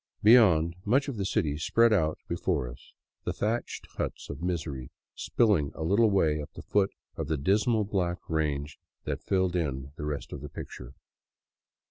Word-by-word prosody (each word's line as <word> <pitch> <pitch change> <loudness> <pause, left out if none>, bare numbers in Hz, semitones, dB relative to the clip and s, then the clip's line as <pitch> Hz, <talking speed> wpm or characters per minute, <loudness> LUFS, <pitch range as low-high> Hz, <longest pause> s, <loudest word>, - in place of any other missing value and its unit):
Beyond, 90 -8 +6
much 130 +8 +2
of 135 -5 -4
the 100 -1 -1
city 75 -5 0
spread 115 +8 +4
out 80 -6 +2
be 85 - -2
fore 80 -8 0
us, - - -12 0.3
the - - -2
thatched 115 +3 -2
huts - - -4
of 70 +2 -8
misery 80 -8 -3 0.2
spilling 100 - +2
a 80 - -4
little 100 +7 +4
way 80 -6 +2
up 75 - -8
the - - -9
foot 100 -1 +2 0.3
of 80 - -3
the 80 0 0
dismal 105 - +2
black 90 -3 -1
range 75 -2 -1 0.2
that - - -3
filled 95 -2 +1
in 70 -5 -2
the 75 - -4
rest 75 -1 -4
of - - -6
the 75 - -7
picture. 65 -1 -9
85 Hz, 175 wpm, -29 LUFS, 75-100 Hz, 0.3 s, Beyond